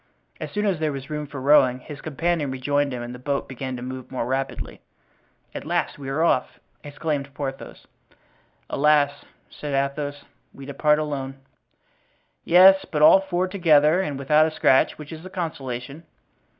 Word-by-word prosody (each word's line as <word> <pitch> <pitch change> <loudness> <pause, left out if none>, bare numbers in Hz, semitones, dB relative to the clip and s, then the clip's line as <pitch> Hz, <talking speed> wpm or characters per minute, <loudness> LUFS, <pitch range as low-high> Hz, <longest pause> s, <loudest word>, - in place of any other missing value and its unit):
As - - -5
soon 210 0 -1
as 190 -6 0
there 155 -1 0
was 135 +1 -7
room 150 -1 -4
for 140 -1 -8
rowing, 130 -2 +4
his 145 +3 -10
companion 160 0 -1
rejoined 140 +2 0
him 125 -1 -5
and 120 +1 -7
the 125 - -9
boat 140 +2 -2
began 130 0 -5
to 120 - -7
move 130 0 -7
more 130 - -3
rapidly. 135 +2 -4 0.7
"At - - -6
last - - -2
we 135 -1 -6
are 150 +4 0
off!" 130 -6 +1 0.2
exclaimed 145 -1 -4
Porthos. 135 -2 -6 0.8
"Alas," 145 -1 +2 0.3
said 145 -2 -5
Athos, 145 +1 -2 0.3
"we 135 - -10
depart 150 +2 +2
alone." 140 -3 -4 1.1
"Yes; 190 +2 +7
but 150 -1 -1
all 190 - +8
four 185 -1 -1
together 165 -3 +4
and 145 -7 -3
without 150 +3 +3
a - - -1
scratch; 135 -4 +2
which 150 -1 -10
is 160 +1 -10
a 185 - -9
consolation." 140 -5 -5
145 Hz, 165 wpm, -23 LUFS, 135-155 Hz, 1.1 s, all